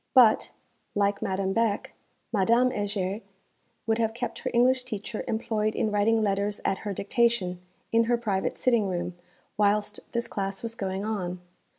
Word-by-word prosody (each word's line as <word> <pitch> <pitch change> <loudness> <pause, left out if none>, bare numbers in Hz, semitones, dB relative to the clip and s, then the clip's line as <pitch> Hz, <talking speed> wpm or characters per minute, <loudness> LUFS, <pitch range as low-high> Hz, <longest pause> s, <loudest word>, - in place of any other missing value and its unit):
But, 235 -4 +6 0.4
like 200 0 +1
Madame 195 0 0
Beck, 225 -2 0 0.4
Madame 235 +5 +4
Heger 205 -1 -2 0.6
would 225 0 +1
have 225 -1 +1
kept 240 - -4
her - - -3
English 255 +2 +4
teacher 215 -3 -5
employed 220 -1 0
in 215 - +1
writing 215 +2 +3
letters 205 0 0
at 190 - +1
her 205 - -4
dictation, 200 -3 +1 0.3
in 230 0 +4
her 240 +1 +2
private 205 -5 -1
sitting 235 -5 +3
room, 175 -1 -2 0.4
whilst 210 0 +2
this 235 0 -1
class 195 0 -3
was 230 -1 -3
going 195 -2 -3
on. 185 -5 -2
210 Hz, 155 wpm, -27 LUFS, 195-230 Hz, 0.6 s, But